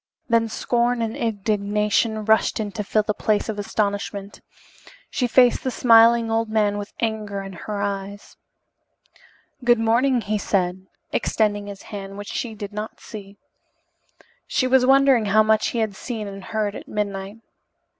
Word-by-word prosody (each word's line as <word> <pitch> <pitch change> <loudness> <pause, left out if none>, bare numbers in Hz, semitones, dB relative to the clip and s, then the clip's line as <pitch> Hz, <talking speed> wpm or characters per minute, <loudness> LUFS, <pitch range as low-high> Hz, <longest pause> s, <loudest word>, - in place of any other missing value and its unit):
Then 230 -1 +3
scorn 240 +2 0
and 225 +1 -3
indignation 210 -1 0
rushed 220 +1 +3
in 210 -2 -3
to 210 +1 -4
fill 215 +1 +1
the 210 - -1
place 215 +1 0
of 210 -1 -3
astonishment. 205 -1 -3 0.7
She 250 - 0
faced 245 0 +4
the 260 - 0
smiling 230 -1 +5
old 225 0 0
man 210 -2 +1
with 205 - -7
anger 215 -3 -2
in 195 0 -8
her 205 +3 -5
eyes. 200 0 -5 1.3
"Good 240 0 +5
morning," 235 +3 +2
he 215 0 -2
said, 185 -1 -1 0.2
extending 205 -2 0
his 200 -1 -9
hand, 195 -1 -7
which 205 0 -7
she 235 -4 -4
did 205 -1 -7
not 210 +1 -6
see. 200 -2 -10 1.1
She 255 - +1
was 255 0 +4
wondering 270 -4 +5
how 215 +2 +4
much 215 0 +2
he - - -3
had 220 -3 -1
seen 220 -1 -5
and 195 -1 -8
heard 215 -2 -2
at - - -9
midnight. 200 0 -4
215 Hz, 155 wpm, -23 LUFS, 205-230 Hz, 1.3 s, smiling